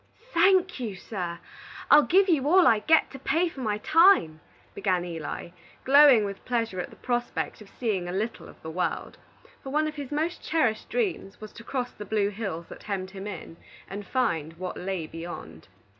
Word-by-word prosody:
"Thank 365 -1 +4
you, 220 -6 -4
sir; 180 -3 -5 0.5
I'll 295 - +9
give 380 +6 +4
you 295 -6 +2
all 365 +3 +6
I 220 - +5
get, 320 +9 +3
to 270 - -9
pay 325 +7 +1
for 285 - -12
my 210 -3 -1
time," 310 - +4 0.3
began 180 -3 0
Eli, 165 -1 -6 0.3
glowing 270 -5 +7
with 200 -1 -6
pleasure 230 -6 -2
at 180 - -4
the - - -15
prospect 240 -2 -3
of 205 - -13
seeing 205 -7 -2
a - - -4
little 215 +5 -4
of - - -16
the 160 - -6
world; 180 +1 -3 0.4
for 270 - -8
one 305 +3 +1
of 305 - -4
his 285 -2 -6
most 315 +4 -2
cherished 255 -9 0
dreams 395 - -2
was 215 -1 -10
to 230 - -11
cross 250 0 -3
the 210 - -9
blue 205 -2 +1
hills 195 -5 -5
that - - -11
hemmed 190 -2 -4
him 195 0 -7
in, 170 -4 -8 0.3
and 200 +1 -7
find 165 - -1
what 180 +2 -6
lay 185 -3 -3
beyond. 155 - -9
215 Hz, 190 wpm, -27 LUFS, 185-290 Hz, 0.5 s, I'll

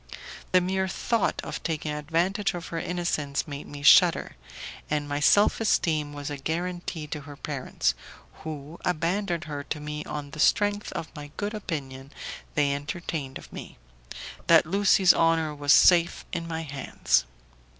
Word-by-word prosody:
The 185 - +5
mere 190 +1 0
thought 225 +3 0
of - - -5
taking 155 -2 -2
advantage 175 +7 0
of 175 - -6
her 165 - -3
innocence 165 -6 -2
made 145 -1 -7
me 145 0 -9
shudder, - - +6 0.5
and 150 -1 -1
my 145 0 -2
self 205 +9 +4
esteem 155 -8 +1
was 145 0 -6
a 145 - -4
guarantee 170 +2 -3
to 150 0 -6
her 145 0 -10
parents, 140 -3 -1 0.5
who 155 +1 -7
abandoned 175 +1 -1
her 145 -2 -5
to 150 - -4
me 150 0 -5
on 145 -1 -6
the 155 - -9
strength 205 +4 +2
of 165 - -6
the 145 -3 -8
good 205 +1 -2
opinion 140 -9 -6 0.4
they 145 -2 +2
entertained 145 -2 -4
of - - -14
me, - - -9 0.7
that 165 0 +6
Lucie's 190 +1 +5
honour 165 -2 +2
was 145 -1 +1
safe 170 0 +5
in 170 -1 -3
my 165 -1 -3
hands. 135 - 0
160 Hz, 155 wpm, -26 LUFS, 145-175 Hz, 0.7 s, shudder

